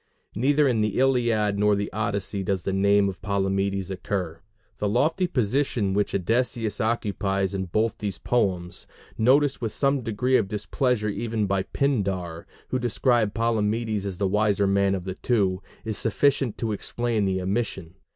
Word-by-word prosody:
Neither 140 +6 +3
in 120 -4 +1
the 105 -1 0
Iliad 120 -6 +2
nor 105 0 +4
the 100 0 -3
Odyssey 100 -2 -2
does 95 -1 -1
the 95 - -1
name 100 +1 +3
of 95 -1 -5
Palamedes 95 -1 -1
occur; 90 -4 -3 0.4
the 105 - 0
lofty 160 - +2
position 125 - 0
which 100 0 0
Odysseus 115 +2 0
occupies 100 -3 0
in 95 -1 -2
both 110 +6 -1
those 100 -3 -3
poems 90 -7 -1 0.3
noticed 135 +5 +3
with 115 -2 -2
some 140 -1 +1
degree 125 +3 +1
of 100 - 0
displeasure 105 +2 -1
even 110 0 -2
by 100 -1 +1
Pindar, 95 -10 -2 0.2
who 130 - 0
described 120 -2 +1
Palamedes 110 -2 0
as 95 -3 -5
the 100 - +1
wiser 105 0 +2
man 100 0 +2
of 90 -2 -5
the 95 - -3
two 95 -4 0 0.2
is 110 -2 -2
sufficient 130 0 +1
to 115 -2 -2
explain 115 +1 -1
the 95 -1 0
omission. 95 -3 -2
105 Hz, 160 wpm, -25 LUFS, 95-120 Hz, 0.4 s, nor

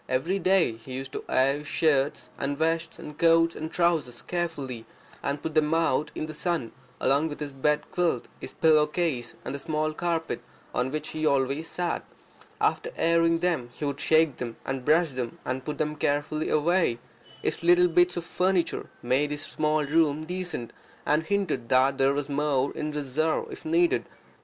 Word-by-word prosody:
Every 165 +10 0
day 185 -11 +3
he 115 +3 -10
used 130 +1 -5
to - - -5
air 135 +2 +3
his 150 - -10
shirts 145 -3 +1
and 140 +1 -1
vests 165 +1 0
and 150 - -9
coats 165 0 +4
and 160 +1 -5
trousers 165 -9 0
carefully, 145 -9 -3 0.3
and 140 +1 -2
put 160 - -3
them 155 0 +3
out 155 -2 +1
in - - -2
the 155 - -7
sun, 160 -7 -2 0.3
along 140 +4 +2
with 145 - -7
his 145 -2 -5
bed 150 +2 +1
quilt, 175 -2 0
his - - -7
pillowcase, 150 -5 +2
and - - -3
the 140 - -4
small 155 +1 -1
carpet 165 0 -2 0.3
on 125 +1 0
which 155 +3 -4
he 155 0 -4
always 140 +2 +1
sat. 175 +1 -2 0.6
After 475 - +1
airing 165 0 +3
them 170 -9 0
he 150 - -5
would 140 -1 -2
shake 160 -4 +3
them, 120 -2 -5
and 135 -1 -3
brush 160 +3 +3
them, 125 -2 -4
and 130 0 -2
put 150 -1 -4
them 150 -1 0
on 150 - -14
the 145 +1 +3 0.4
rock. 170 -5 +2 0.5
His - - -1
little 175 +1 +5
bits 175 +1 +3
of 170 - -3
furniture 180 0 0
made 130 +4 +2
his 145 0 -3
small 155 -1 0
room 155 0 +2
decent, 175 -8 -4 0.3
and 150 +2 +3
hinted 165 -9 -1
that 135 +1 +3
there 135 +1 +4
was 145 0 -2
more 145 -2 +1
in 150 0 -3
reserve 150 +2 -1
if - - -10
needed. 340 +2 +2
150 Hz, 180 wpm, -27 LUFS, 135-165 Hz, 0.6 s, little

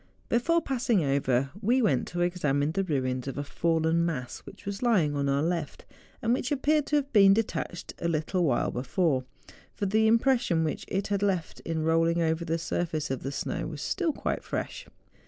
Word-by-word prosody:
Before 330 +8 +2
passing 240 - +1
over, 135 -1 +1
we 240 +5 +3
went 145 - +2
to 175 0 -3
examine 150 -5 +1
the 195 +3 0
ruins 130 -6 -1
of 135 - -4
a 145 - -2
fallen 165 +2 +1
mass 140 -7 -3
which - - -14
was 200 0 -4
lying 190 -12 +2
on 140 -1 0
our 140 +1 +1
left, 165 -3 -3 0.4
and 230 +1 +3
which 255 +1 -1
appeared 295 +1 +2
to 300 - +1
have 285 -2 0
been 195 -2 +7
detached 205 -5 -3
a 170 - -1
little 170 +3 0
while 135 -7 +1
before; 130 +1 0 0.5
for 205 - -2
the 220 +3 +3
impression 230 -8 +3
whicli 155 - -3
it 195 +1 -2
had 200 -1 0
left 190 -5 -1
in 160 -1 -3
rolling 165 +1 +2
over 160 0 +1
the 165 0 -1
surface 160 -3 -2
of 135 - -2
the 135 - -4
snow - - -3
was - - -6
still 355 -4 0
quite - - -3
fresh. - - -5
170 Hz, 195 wpm, -28 LUFS, 145-215 Hz, 0.5 s, been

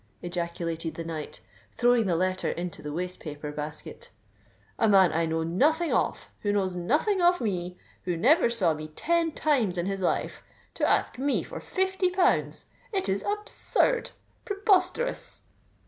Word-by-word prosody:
ejaculated 170 -2 -3
the 165 - -5
knight, 160 -2 -6 0.3
throwing 245 -3 +3
the 175 - +2
letter 185 +2 0
into 175 0 -4
the 150 - -5
waste 180 +4 -4
paper 150 -1 -6
basket. 150 0 -7 0.7
"A 225 - +4
man 190 -3 +6
I 165 0 +1
know 160 0 -1
nothing 305 - +2
of—who 205 - -1
knows 190 -3 0
nothing 300 - +1
of 355 +1 +4
me—who 180 -3 -4
never 255 - +4
saw 195 -9 +2
me 155 0 -6
ten 330 - 0
times 255 -13 +1
in 175 - -1
his 195 0 -2
life—to 180 - -2
ask - - +1
me 280 +1 +1
for - - -7
fifty 380 -1 0
pounds! 360 0 +1 0.3
It 390 -3 0
is 195 +1 0
absurd—preposterous!" 415 0 0
195 Hz, 140 wpm, -27 LUFS, -, 0.7 s, man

